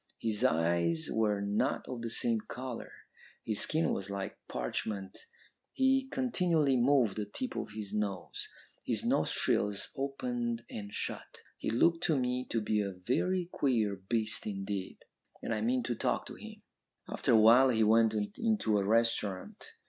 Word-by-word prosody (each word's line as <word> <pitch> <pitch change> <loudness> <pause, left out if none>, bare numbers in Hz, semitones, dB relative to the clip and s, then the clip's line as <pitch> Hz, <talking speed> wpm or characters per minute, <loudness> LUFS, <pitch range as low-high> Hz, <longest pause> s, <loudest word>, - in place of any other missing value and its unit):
His 110 -2 -2
eyes 85 0 +1
were 105 -2 +1
not 105 +7 0
of 125 -2 -5
the 115 - -3
same 115 0 +3
colour; 125 -1 -6 0.5
his 110 -2 -1
skin 160 +1 +1
was 95 0 -3
like 100 -1 -4
parchment; 95 - -4 0.5
he 265 0 +2
continually 180 - +1
moved 120 -5 +3
the 105 -1 -2
tip 255 - -5
of 105 - -4
his 105 -2 -5
nose. 100 -4 -3 0.3
His - - -2
nostrils 100 -1 +1
opened 120 -4 -3
and 100 -1 -6
shut. - - -6
He - - -3
looked 165 +9 +2
to 155 - +2
me 125 0 -1
to 115 - 0
be 105 0 +1
a 100 -1 -3
very 170 - 0
queer 110 -7 +1
beast 110 +4 -1
indeed, 95 -1 -4 0.5
and - - -1
I 110 - -1
meant 125 +3 +1
to 120 - -1
talk - - -1
to - - -8
him. - - -11 0.4
"After - - +1
a 110 - +7
while 120 +5 +7
he 110 -3 +3
went 110 0 +4 0.2
into 210 - +2
a - - 0
restaurant. 105 -3 0
115 Hz, 155 wpm, -32 LUFS, 100-130 Hz, 0.5 s, a